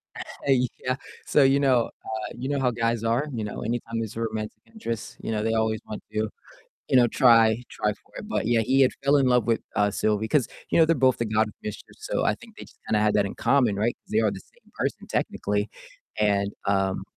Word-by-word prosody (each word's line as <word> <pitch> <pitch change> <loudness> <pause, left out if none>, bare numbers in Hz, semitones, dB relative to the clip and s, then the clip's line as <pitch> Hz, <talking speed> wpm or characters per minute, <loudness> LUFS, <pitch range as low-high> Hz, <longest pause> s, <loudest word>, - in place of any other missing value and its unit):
Uh, - - -6 0.6
yeah. 130 0 +1 0.3
So, 145 - +4
you 135 +1 +4
know, 130 -4 +3 0.2
uh 110 -1 -4
you 130 +3 -4
know 140 -1 0
how 125 -2 +2
guys 115 -1 -1
are, 120 +6 +1
you 110 -3 -3
know? 105 - -5
Anytime 115 0 -3
there's 110 -1 -4
a 115 - -4
romantic 110 -1 -3
interest, 115 - -6
you - - -4
know, 105 -1 -1
they 110 0 +1
always 110 -1 +1
want 105 - -6
to, 110 0 0 0.6
you - - +2
know, 120 -1 +6
try 115 -1 +5
try 105 -1 -1
for - - -27
it, 210 - -7
but 220 - -1
yeah, 115 -1 +3
he 135 +5 +3
had 130 - +5
fell 140 +1 +4
in 135 - +3
love 125 -3 +3
with, 115 -1 +1
uh, 105 0 +2
Sylvie 105 +1 0
'cause, 135 0 +2 0.2
you - - +3
know, 160 - +7
they're 165 0 +3
both 130 -1 +3
the 120 - -1
God 110 0 +2
of 105 - -11
mischief, 105 0 -7
so - - -2
I - - +2
think - - -16
they - - -8
just - - -18
kinda 105 - +2
had 105 0 +2
that 105 - +3
in 100 - -5
common, 125 -7 +2
right? 110 +4 0
'Cause - - -19
they 110 - +3
are 110 -3 +2
the - - -6
same - - -24
person - - -3
technically, 105 +1 -1 0.5
and, 100 -1 +1
um, 95 -1 +1
115 Hz, 240 wpm, -25 LUFS, 105-125 Hz, 0.6 s, know